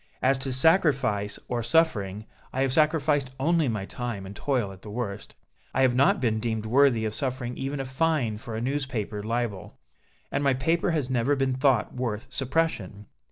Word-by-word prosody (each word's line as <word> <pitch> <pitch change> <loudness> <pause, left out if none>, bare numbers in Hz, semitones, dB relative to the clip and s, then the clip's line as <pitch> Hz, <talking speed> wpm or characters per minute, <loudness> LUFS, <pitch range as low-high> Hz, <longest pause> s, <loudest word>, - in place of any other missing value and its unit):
As 135 +1 +3
to 135 0 -3
sacrifice 130 - +2
or 120 -1 -1
suffering, 110 - +1 0.3
I 130 - 0
have 135 -1 0
sacrificed 150 -2 +2
only 160 +2 +2
my 105 -5 -2
time 120 -3 -5
and 100 +1 -9
toil 125 -5 -1
at 95 -1 -13
the 105 - -10
worst. 105 -2 -5 0.4
I 135 - +3
have 130 -2 +4
not 135 +3 +4
been 115 -4 +1
deemed 110 -1 -2
worthy 120 -1 +4
of 110 - -2
suffering 125 -1 -3
even 135 +1 -3
a 135 - -2
fine 130 -5 0
for 110 0 -7
a 110 - -3
newspaper 125 -6 -2
libel, 115 -3 -3 0.5
and 145 - 0
my 135 -2 +3
paper 165 +8 +1
has 150 -6 -1
never 130 +3 +2
been 135 -1 +1
thought 130 -4 +2
worth 115 -4 -3
suppression!" 130 - -1
130 Hz, 180 wpm, -26 LUFS, 110-140 Hz, 0.5 s, have